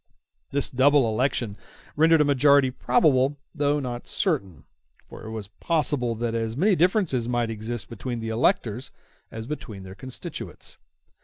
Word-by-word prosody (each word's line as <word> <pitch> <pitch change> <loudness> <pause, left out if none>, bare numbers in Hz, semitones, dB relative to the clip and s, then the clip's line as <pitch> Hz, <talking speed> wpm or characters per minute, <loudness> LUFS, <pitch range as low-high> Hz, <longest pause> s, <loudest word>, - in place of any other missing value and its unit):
*w 70 +4 -48
This 140 - +1
double 135 0 +4
election 115 -2 -1 0.4
rendered 160 +1 +5
a - - +4
majority 140 -1 +4
probable, 130 +2 +2 0.2
though 145 -2 +1
not 125 -3 -5
certain; 100 - -1 0.4
for - - -12
it - - -6
was 110 -3 -6
possible 140 -1 0
that 115 0 -2
as 115 0 -2
many 195 +5 +4
differences 170 - +1
might 120 -2 0
exist 110 -1 -4
between 120 +1 -5
the 115 0 -4
electors 120 - 0 0.4
as 110 0 -6
between 115 -8 -7
their 95 0 -9
constituents. 130 +5 -8
125 Hz, 150 wpm, -25 LUFS, 115-145 Hz, 0.4 s, rendered